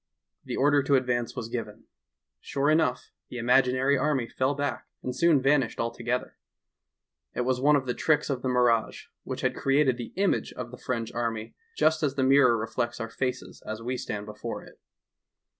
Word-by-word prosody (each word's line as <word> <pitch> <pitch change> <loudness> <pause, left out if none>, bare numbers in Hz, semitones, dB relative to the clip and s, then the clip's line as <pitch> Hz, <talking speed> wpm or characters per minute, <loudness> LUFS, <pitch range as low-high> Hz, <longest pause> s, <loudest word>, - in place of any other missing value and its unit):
The - - -4
order 145 +1 +4
to 140 +1 +2
advance 125 -2 0
was 125 -3 -4
given. 115 -2 -6 0.6
Sure 140 +2 0
enough, 155 -5 +1 0.2
the 125 - -7
imaginary 130 +3 +3
army 135 -4 +1
fell 130 +4 0
back, 145 -1 -3 0.2
and 125 - -3
soon 170 -4 +4
vanished 135 -2 +2
altogether. 120 +1 -3 1.0
It - - 0
was 125 0 0
one 150 +2 +5
of 135 -2 0
the 125 - -1
tricks 150 +2 +1
of 135 -3 -2
the 130 - -1
mi 125 - +1
rage, 115 -2 +1
which - - -4
had - - 0
created 135 -2 +2
the 120 - -6
image 195 +1 0
of 120 -1 -7
the 125 - -9
French 115 -3 -3
army 115 -2 -3 0.2
just 155 0 +3
as 140 -3 0
the 135 - +1
mirror 130 -3 +5
reflects 115 +2 -3
our 115 0 -4
faces 130 +1 -4
as 110 0 -5
we 125 +2 -2
stand 105 -4 -4
before 105 +2 -6
it. - - -16
125 Hz, 185 wpm, -27 LUFS, 120-140 Hz, 1.0 s, one